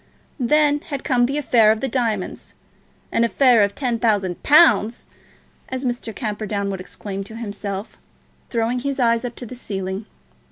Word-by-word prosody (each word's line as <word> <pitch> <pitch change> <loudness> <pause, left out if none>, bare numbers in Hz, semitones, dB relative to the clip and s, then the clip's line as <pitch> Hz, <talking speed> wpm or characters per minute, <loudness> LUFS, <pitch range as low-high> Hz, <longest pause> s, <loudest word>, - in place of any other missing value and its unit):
Then 295 +3 +3
had 285 -3 -6
come 245 -4 +2
the 280 +3 -2
affair 235 -7 +4
of 220 - 0
the 270 - -1
diamonds; 225 -6 -2 0.6
an 230 - +2
affair 240 -1 +4
of 200 0 +1
ten 245 -4 -1
thousand 200 -6 0
pounds! 285 -7 +4 0.6
as 260 +1 -4
Mr. 240 -2 -3
Camperdown 210 -3 -3
would 190 -1 -5
exclaim 195 +1 -6
to 220 - -10
himself, 205 -2 -6 0.5
throwing 235 +1 0
his 280 +1 -3
eyes 230 -1 +2
up 240 -1 -5
to 245 - -8
the 240 - -9
ceiling. 195 -4 -5
230 Hz, 160 wpm, -21 LUFS, 205-255 Hz, 0.6 s, affair